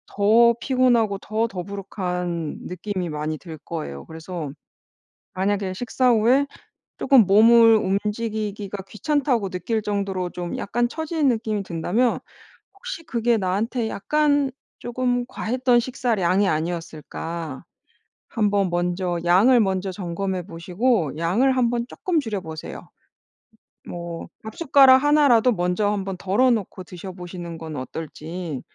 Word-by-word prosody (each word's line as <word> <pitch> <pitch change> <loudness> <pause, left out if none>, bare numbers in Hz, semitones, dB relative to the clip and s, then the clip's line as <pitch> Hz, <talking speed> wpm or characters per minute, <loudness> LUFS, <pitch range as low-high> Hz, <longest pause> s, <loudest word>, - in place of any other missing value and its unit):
더 230 +3 +5
피곤하고 240 -6 +2
더 220 +3 -1
더부룩한 180 -4 -4
느낌이 185 -1 -4
많이 155 +1 -3
들 160 -1 -10
거예요. 150 - -6
그래서 160 -1 -6 0.9
만약에 195 0 0
식사 245 +3 +1
후에 245 +5 +4 0.5
쪼금 260 -7 +5
몸을 225 +3 +7
움직이기가 210 -1 -2
귀찮다고 250 -4 0
느낄 215 +5 -2
정도로 195 -3 -2
좀 175 -1 -5
약간 240 +4 0
처지는 315 +1 -1
느낌이 220 -4 0
든다면 190 +8 0 0.6
'혹시 395 -5 -7
그게 235 -5 +1
나한테 215 +5 -1
약간 290 +5 +1 0.3
쪼금 245 0 -1
과했던 250 +1 +1
식사량이 210 -7 +1
아니었을까?' 165 0 -4 0.7
한번 205 -4 +1
먼저 175 0 -1
양을 215 +9 +5
먼저 190 -2 0
점검해 185 0 -3
보시고 175 - 0
양을 215 +12 +2
한번 240 -1 +1
쪼끔 345 +3 -1
줄여 220 -8 -3
보세요. 160 -2 -8 1.0
뭐 170 -1 -6 0.2
밥숟가락 265 +2 +5
1 295 0 +5
라도 240 -1 +5
먼저 180 +1 0
한번 195 -2 -3
덜어 205 +8 +2
놓고 200 -4 -2
드셔보시는 175 -2 -8
건 160 -2 -7
어떨지 160 +2 -6
200 Hz, 275 characters per minute, -23 LUFS, 180-240 Hz, 1.0 s, 몸을